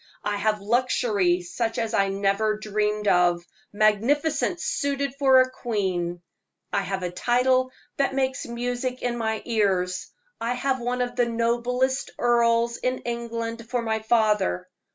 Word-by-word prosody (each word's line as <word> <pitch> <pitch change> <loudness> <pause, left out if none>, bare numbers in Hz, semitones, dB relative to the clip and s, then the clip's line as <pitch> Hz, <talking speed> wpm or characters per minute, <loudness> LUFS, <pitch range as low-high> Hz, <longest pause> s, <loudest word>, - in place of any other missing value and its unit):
I 205 0 -1
have 210 0 0
luxury 210 -5 +1
such 225 +6 -3
as 225 0 -2
I 195 -2 +2
never 200 +2 +1
dreamed 210 0 -1
of 175 -2 +3 0.3
magnificence 270 - +1
suited 280 -1 -1
for 265 -2 +6
a 255 0 0
queen! 185 -8 -2 0.5
I 200 - +2
have 195 0 -3
a 175 - -2
title 255 +5 +2 0.3
that 275 -1 +1
makes 265 -1 -1
music 245 +1 -3
in 245 -1 0
my 220 -2 -2
ears! 190 -5 0 0.3
I 235 +2 -1
have 260 +1 0
one 245 +1 -2
of 245 0 -2
the 245 -1 +2
noblest 240 +3 0
earls 235 -1 +2
in 255 0 -2
England 230 -1 -4
for 245 -2 -1
my 220 -1 0
father! 215 - +1
230 Hz, 145 wpm, -25 LUFS, 205-250 Hz, 0.5 s, for